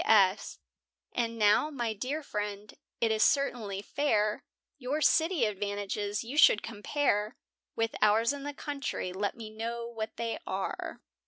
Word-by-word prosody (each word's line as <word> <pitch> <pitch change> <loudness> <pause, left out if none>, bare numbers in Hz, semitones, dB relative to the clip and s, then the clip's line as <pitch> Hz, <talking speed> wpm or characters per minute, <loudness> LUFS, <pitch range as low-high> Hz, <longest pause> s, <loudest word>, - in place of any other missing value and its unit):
P.S. 200 -3 +4 0.6
And 230 -1 -1
now, 210 +7 +4
my 240 -6 -2
dear 265 +9 -3
friend, 210 -3 -4 0.3
it 230 -1 +2
is 215 0 +1
certainly 220 -9 +1
fair, 215 -8 +1 0.4
Your 270 +3 -1
city 315 -1 +3
advantages 205 0 -2
you 265 +6 -2
should 210 - +7
compare 215 -1 -1 0.4
With 225 0 0
ours 220 +4 +4
in 285 - -6
the 290 +1 -5
country, 280 -11 -4
let 200 +3 -2
me 220 -2 -8
know 230 +2 -4
what 225 -2 -6
they 230 -1 -2
are. - - -4
225 Hz, 145 wpm, -30 LUFS, 210-270 Hz, 0.6 s, should